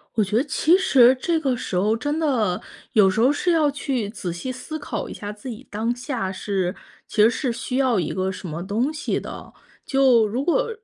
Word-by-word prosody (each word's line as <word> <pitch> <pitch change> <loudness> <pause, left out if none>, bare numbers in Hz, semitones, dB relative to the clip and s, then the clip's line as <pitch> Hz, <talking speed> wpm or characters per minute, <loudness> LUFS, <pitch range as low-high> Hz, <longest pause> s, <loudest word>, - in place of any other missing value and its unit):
我 220 - +3
觉 205 +2 -3
得 240 - +3
其 315 +4 +3
实 260 -9 +5
这 335 -2 +1
个 270 -5 0
时 215 - -5
候 205 +5 +2
真 290 +7 -2
的 235 - +1 0.3
有 205 -3 +6
时 215 +4 0
候 255 +4 +5
是 350 +4 0
要 315 -3 +3
去 270 -6 -2
仔 195 -5 -5
细 175 +10 -5
思 260 +5 -6
考 290 - -4
一 - - -6
下 205 0 -6
自 210 +5 -9
己 240 +3 -9
当 225 +3 -1
下 245 -6 -3
是 190 -2 -2 0.3
其 215 - +1
实 215 - +7
是 250 +1 -1
需 240 +2 -3
要 255 -6 +2
一 160 - -2
个 190 0 -1
什 185 - -8
么 165 +2 -5
东 220 +9 0
西 305 -1 -2
的。 - - -9 0.3
就 260 -5 +4
如 240 +6 -2
果 470 +10 +1
240 Hz, 240 characters per minute, -23 LUFS, 205-275 Hz, 0.3 s, 实